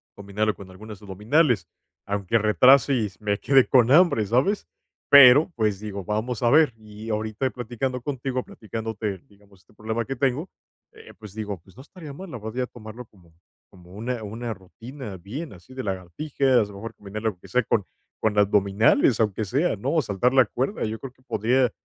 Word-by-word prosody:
dominarlo 100 +2 -2
con 100 -2 -12
algunas 105 +2 -11
abdominales, 105 - +1 0.4
aunque 100 +2 0
retrase 125 +7 +5
y 110 -5 0
me 105 -1 -1
quedé 135 -2 +4
con 125 -3 +4
hambre", 165 -7 +5
¿sabes?, 130 - +1 0.4
pero, 140 +4 +8
pues, 105 -4 0
digo: 100 -2 -6
"Vamos 110 +3 -2
a 120 - +4
ver", 155 -4 +5
y 110 0 -11
ahorita 110 +4 -2
platicando 125 +2 -4
contigo, 130 -1 -3
platicándote, 110 -3 -5
digamos, 100 -1 -23
este - - -27
problema 110 +2 -3
que 135 - -4
tengo, 135 +6 -1 0.4
eh, - - -15
pues, 105 -3 -12
digo: 105 -3 -5
"Pues, 95 +2 -21
no 130 - -12
estaría 155 -1 -11
mal, 190 +6 -9
la 125 - -7
podría 115 +4 -4
tomarlo 115 +1 -10
como 90 -6 -24 0.4
como 90 -1 -18
una 115 +4 -4
una 115 +3 -5
rutina 110 +3 -10
bien 125 - -7
así 95 +7 -16
de 130 0 -5
lagartijas, 110 - 0
a - - -10
lo - - -12
mejor, 115 +2 -7
combinarlo 105 +2 -4
aunque 90 -4 -12
sea 125 0 +1
con 105 -1 0 0.4
con 105 -2 0
abdominales, 105 +4 +3
aunque 110 -1 0
sea", 140 - 0
¿no?, 140 +10 0
saltar 120 +2 0
la 130 -2 +6
cuerda, 130 - -3
yo 110 0 -3
creo 135 - -8
que 130 - -30
podría 125 +1 +1
110 Hz, 180 wpm, -24 LUFS, 105-130 Hz, 0.4 s, pero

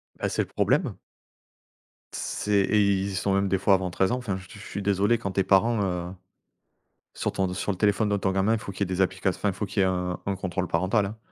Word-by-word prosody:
bah, - - -2
c'est - - 0
le - - -10
problème. - - +1 1.2
C'est 105 - -3
et 105 +2 +2
ils 100 -1 +2
y - - -4
sont 95 +1 0
même 100 0 +2
des 95 0 +1
fois 100 0 +4
avant 95 -1 -2
13 95 +3 +1
ans. 125 - +1
Enfin, 115 -7 -3
je 95 0 -12
suis 100 - -12
suis 100 - -6
désolé, 100 +3 +2
quand 100 -5 -3
tes 95 - +2
parents, 110 +4 +3
heu, 90 -1 -2 1.0
sur - - -2
ton 95 -2 -1
sur 100 +2 -2
le 95 - -5
téléphone 105 +1 +2
de 100 - +1
ton 95 -1 0
gamin, 100 +4 +2
faut 100 - -7
qu'il 95 - -11
y - - +5
ait - - +1
des 95 - +1
applications 95 0 0
enfin, 105 - +1
faut 100 +3 -4
qu'il 100 - 0
y - - +5
ait - - +3
un 90 -1 -2
un 100 -1 -1
contrôle 95 -1 -3
parental, 95 +6 +1
hein. 105 +3 -6
95 Hz, 255 wpm, -26 LUFS, 95-100 Hz, 1.2 s, y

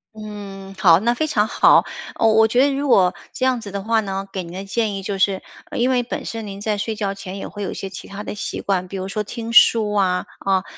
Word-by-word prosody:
嗯， 200 -2 -8
好， 175 -3 +6
那 235 +3 +1
非 310 +6 -1
常 215 -7 +1
好。 - - +5 0.3
呃， - - +1
我 220 0 +5
觉 245 +3 +3
得 285 - +1
如 280 +1 -2
果 185 -7 +4 0.2
这 260 - -2
样 255 -3 +1
子 200 -3 -8
的 200 -1 -4
话 225 0 +2
呢， 195 -2 -3
给 190 - -2
您 170 - -10
的 190 +2 -6
建 210 0 -1
议 195 - -5
就 195 0 -3
是 190 0 +1 0.3
因 245 +2 +2
为 250 -1 +2
本 240 - -5
身 225 -2 -5
您 200 0 -7
在 210 -1 -1
睡 220 +1 -2
觉 200 -2 -2
前 195 0 -8
也 - - -5
会 205 - -8
有 195 - -2
一 - - -4
些 195 - -6
其 190 - -9
他 200 +1 -7
的 - - -5
习 210 - -5
惯， 185 -2 -1
比 195 - -6
如 190 0 -4
说 210 +2 -2
听 230 +2 -6
书 220 -3 +6
啊。 185 -3 +1
啊， 190 -1 +1
205 Hz, 285 characters per minute, -21 LUFS, 195-225 Hz, 0.3 s, 好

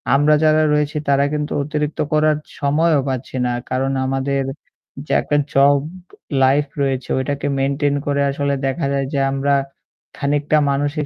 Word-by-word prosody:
আমরা 145 +2 +4
যারা 155 0 +4
রয়েছি 150 0 0
তারা 140 0 +3
কিন্তু 150 0 -2
অতিরিক্ত 150 +1 -3
করার 155 0 +3 0.2
সময়ও 150 +1 +2
পাচ্ছি 130 0 -5
না। - - 0 0.2
কারণ 135 +1 0
আমাদের 135 +1 -1 0.6
যে - - -2
একটা 145 - 0 0.2
জব 140 +1 +5 0.6
লাইফ 140 +3 +3 0.2
রয়েছে 135 -2 -1
ওইটাকে 140 +2 -2
মেইনটেইন 140 +1 0
করে 140 0 +1
আসলে 140 0 -1
দেখা 140 +2 -2
যায় 135 -1 0
যে 140 - +1
আমরা 140 +1 0 0.6
খানিকটা 145 +1 +1
মানসিক 145 +2 -1
140 Hz, 145 wpm, -19 LUFS, 135-150 Hz, 0.6 s, জব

